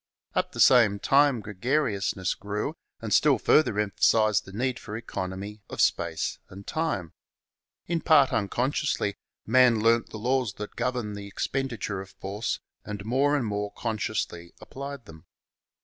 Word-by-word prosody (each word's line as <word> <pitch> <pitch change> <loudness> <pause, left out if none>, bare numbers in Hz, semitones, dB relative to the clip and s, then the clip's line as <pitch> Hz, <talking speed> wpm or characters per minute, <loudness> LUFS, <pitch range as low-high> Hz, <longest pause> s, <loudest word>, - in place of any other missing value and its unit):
At - - -1
the - - -8
same 115 -6 +6
time 135 +2 +3
gregariousness 100 -2 -1
grew 105 +9 -4 0.3
and 110 -2 -2
still 145 -4 +5
further 120 -3 +3
emphasized 110 +1 +3
the 95 - -11
need 125 +5 -2
for 105 0 -6
economy 100 -1 -6
of - - -8
space - - 0
and 100 +2 -11
time. 130 - -2 0.7
In 170 -1 -1
part 140 -4 +5
unconsciously, 120 +1 0 0.3
man 120 -1 +5
learnt 115 +1 +3
the - - -7
laws 125 -1 0
that 105 +1 -8
govern 125 -4 -2
the 100 0 -7
expenditure 115 -3 -3
of 95 - -11
force 100 +3 -4 0.2
and 105 -1 -6
more 135 +5 +2
and 140 -5 0
more 105 -1 -3
consciously 110 -6 -3
applied 140 -1 -8
them. 80 -1 -14
110 Hz, 145 wpm, -27 LUFS, 100-130 Hz, 0.7 s, same